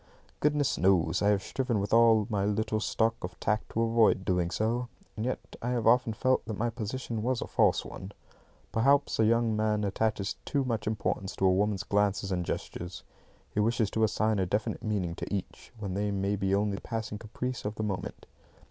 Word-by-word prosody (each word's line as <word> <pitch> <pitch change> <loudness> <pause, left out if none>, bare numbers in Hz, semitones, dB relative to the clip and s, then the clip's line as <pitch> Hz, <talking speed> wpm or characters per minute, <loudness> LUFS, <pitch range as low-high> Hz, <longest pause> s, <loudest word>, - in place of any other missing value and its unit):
Goodness 150 -2 +1
knows 90 -2 +3
I 100 - +3
have 100 -2 +3
striven 125 -5 -1
with 100 +2 -2
all 115 -2 +6
my 105 -4 -1
little 110 +1 0
stock 110 +1 +1
of 90 +1 -6
tact 105 +1 -1
to 115 - 0
avoid 115 -4 +3
doing 90 -2 +1
so. 115 +6 -1 0.3
And 110 +1 -3
yet 130 - -5
I 120 - -2
have 120 -2 -1
often 120 0 +4
felt 130 +4 +1
that 110 -3 -4
my 120 +2 0
position 115 0 -4
was 125 +2 0
a - - -3
false - - +2
one. 95 +2 -8 0.6
Perhaps 140 +5 +3
a 110 - +5
young 115 0 +2
man 105 -1 +1
attaches 100 0 -1
too 140 -2 0
much 115 -4 -2
importance 105 -2 -2
to 95 - 0
a 95 - +5
woman's 100 0 +1
glances 100 -1 +1
and 90 -1 0
gestures. 85 +1 -5 0.5
He - - 0
wishes 110 0 +1
to 110 - +1
assign 110 0 +1
a 95 - +1
definite 105 +4 -1
meaning 100 -6 -1
to - - -6
each, 100 -3 -5
when 100 -4 -4
they 105 +2 -1
may 100 0 0
be 95 -1 +1
only 100 -1 0
the - - -9
passing 110 -2 -4
caprice 125 +3 -4
of 105 +1 -3
the 110 - -3
moment. 100 -3 -4
105 Hz, 200 wpm, -29 LUFS, 100-115 Hz, 0.6 s, all